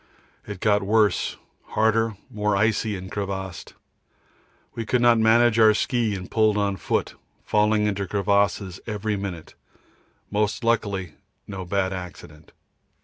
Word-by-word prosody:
It 100 -3 -7
got 105 -1 +3
worse, 105 +1 +1 0.3
harder, 110 0 +1 0.2
more 105 -1 0
icy 110 0 +1
and 95 +1 -9
crevassed. 95 -3 -5 1.0
We 115 - -4
could 125 +3 +1
not 120 -1 +5
manage 115 +1 +4
our 110 -1 +6
ski 115 -3 0
and 90 -1 -8
pulled 110 -2 +3
on 100 -1 0
foot, - - -1 0.3
falling 105 0 +2
into 100 -1 -1
crevasses 100 -1 0
every 105 -1 -2
minute 95 -5 -6 0.8
most 105 +2 0
luckily 100 -7 0 0.3
no 95 -2 -7
bad 95 +1 -1
accident. 85 -4 -10
105 Hz, 130 wpm, -24 LUFS, 95-110 Hz, 1.0 s, our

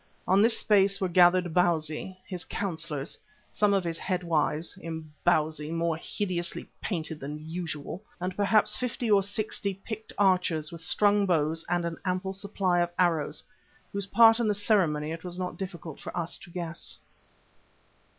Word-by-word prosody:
On 195 +2 +5
this 230 +1 +5
space 200 -1 +3
were 190 - +1
gathered 175 -1 +4
Bausi, 170 +1 +1
his 180 -3 -4
councillors, 160 -7 -3 0.3
some 210 -1 +2
of 195 -2 +2
his 165 -1 -3
head 185 -2 -2
wives, 160 0 0
Imbozwi 155 -1 -1
more 165 0 0
hideously 175 0 -3
painted 160 -5 -3
than 150 +3 -7
usual, 165 0 -5 0.2
and 180 +1 -3
perhaps 205 +1 +3
fifty 245 -2 -2
or 200 -1 +6
sixty 200 0 -2
picked 220 +3 -7
archers 180 -6 +2
with 165 -1 -8
strung 205 +4 +3
bows 160 -1 +1
and 175 -1 +1
an 170 -1 -3
ample 185 0 -1
supply 195 -2 0
of 175 0 +2
arrows, 165 -4 +1 0.5
whose 200 -1 -2
part 225 +2 +7
in 235 - +1
the 210 - +2
ceremony 170 -8 +2
it 165 0 -6
was 180 -1 -4
not 180 -1 -3
difficult 170 -5 -7
for - - -7
us 170 -1 -2
to - - -13
guess. 170 -1 -5
175 Hz, 160 wpm, -28 LUFS, 160-195 Hz, 0.5 s, part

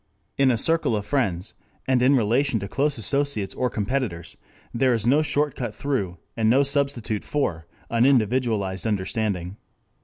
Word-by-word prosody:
In 135 -1 +3
a 120 - +2
circle 155 -3 +1
of 105 -1 -3
friends, 105 -8 -1 0.3
and 130 -2 +3
in 135 +3 +5
relation 120 +2 +2
to 100 - -5
close 140 +6 0
associates 140 -4 -1
or 125 - -1
competitors, 110 -6 -3 0.4
there 125 +1 +2
is 110 -1 -2
no 140 +6 +4
shortcut 145 -4 -1
through, 100 -11 -2 0.2
and 110 -1 +2
no 135 +4 +5
substitute 135 -6 -1
for, 85 - -2 0.2
an 115 0 +2
individualized 115 -6 +1
understanding. 100 -2 -2
120 Hz, 150 wpm, -24 LUFS, 105-140 Hz, 0.4 s, in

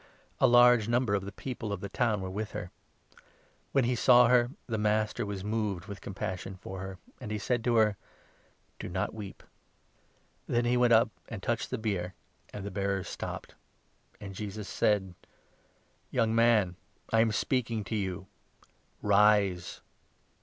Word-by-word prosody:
A - - +6
large 120 -2 +6
number 120 -2 +1
of 100 -1 0
the 100 - -6
people 115 0 -5
of 100 - -2
the 100 - -5
town 105 0 0
were 95 - -4
with 105 +2 -4
her. 105 -4 -5 1.0
When 135 - +3
he 120 +1 +1
saw 120 0 +6
her, 120 -1 +4 0.2
the 110 -3 -2
Master 105 0 0
was 100 -2 -4
moved 105 -4 -1
13 - - -14
with 100 - -7
compassion 95 -1 -5
for 95 +1 -8
her, 95 0 -6 0.2
and 120 - -7
he 105 - -2
said 120 +3 -1
to 120 -1 +2
her: 105 -3 +4 0.4
" - - -37
Do - - -5
not 95 +3 -2
weep." 105 -3 -8 1.0
Then 120 0 +1
he 120 +1 +2
went 125 -1 +4
up 115 -1 +5 0.2
and 105 -5 -7
touched 120 -1 -1
the 130 - -2
bier, 100 -5 -2 0.4
and 100 -1 -7
the 100 - -4
bearers 100 -1 -2
14 - - -6
stopped; - - -6 0.6
and 100 -2 -8
Jesus 105 +1 -6
said: 95 -3 +1 0.5
" - - -38
Young 115 -1 +1
man, 115 -6 +3 0.4
I 110 - +5
am 110 -1 +3
speaking 115 -1 0
to 110 - -4
you 95 -3 -3 0.4
— - - -35
Rise 100 -3 +3
105 Hz, 175 wpm, -30 LUFS, 95-115 Hz, 1.0 s, A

